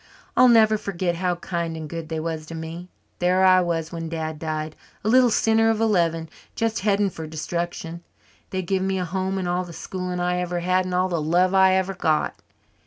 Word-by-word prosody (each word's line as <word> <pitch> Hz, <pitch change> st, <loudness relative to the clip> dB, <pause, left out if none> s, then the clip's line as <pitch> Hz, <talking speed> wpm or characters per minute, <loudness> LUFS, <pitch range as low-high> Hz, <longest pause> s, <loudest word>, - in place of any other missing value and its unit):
I'll 255 Hz, -, +7 dB
never 220 Hz, -2 st, +5 dB
forget 175 Hz, -3 st, -2 dB
how 180 Hz, 0 st, 0 dB
kind 170 Hz, -2 st, -3 dB
and 155 Hz, -1 st, -6 dB
good 165 Hz, 0 st, -6 dB
they 160 Hz, -1 st, -2 dB
was 160 Hz, -1 st, -4 dB
to 165 Hz, -, -7 dB
me. 165 Hz, +2 st, -7 dB, 0.3 s
There 185 Hz, +1 st, +3 dB
I 185 Hz, 0 st, +6 dB
was, 165 Hz, -2 st, -2 dB
when 165 Hz, -1 st, -5 dB
Dad 160 Hz, -1 st, -4 dB
died, 155 Hz, -1 st, -4 dB, 0.3 s
a -, -, -2 dB
little 250 Hz, +2 st, +5 dB
sinner 225 Hz, 0 st, +3 dB
of 225 Hz, -1 st, +1 dB
eleven, 170 Hz, -7 st, +1 dB, 0.3 s
just 225 Hz, 0 st, 0 dB
heading 200 Hz, 0 st, +1 dB
for 160 Hz, -2 st, -7 dB
destruction. 170 Hz, +1 st, -4 dB, 0.5 s
They 185 Hz, -1 st, -2 dB
give 190 Hz, +2 st, 0 dB
me 190 Hz, 0 st, 0 dB
a 180 Hz, -, -1 dB
home 190 Hz, +2 st, -2 dB
and 185 Hz, -2 st, -2 dB
all 180 Hz, +1 st, 0 dB
the 175 Hz, -1 st, -10 dB
schooling 180 Hz, +1 st, -4 dB
I 180 Hz, 0 st, 0 dB
ever 175 Hz, -1 st, -2 dB
had 185 Hz, +1 st, +1 dB
and 185 Hz, -, -4 dB
all 185 Hz, +1 st, +2 dB
the 170 Hz, -3 st, -1 dB
love 175 Hz, +4 st, +2 dB
I 190 Hz, -1 st, +5 dB
ever 190 Hz, 0 st, +1 dB
got. 160 Hz, -4 st, 0 dB
180 Hz, 210 wpm, -24 LUFS, 165-190 Hz, 0.5 s, I'll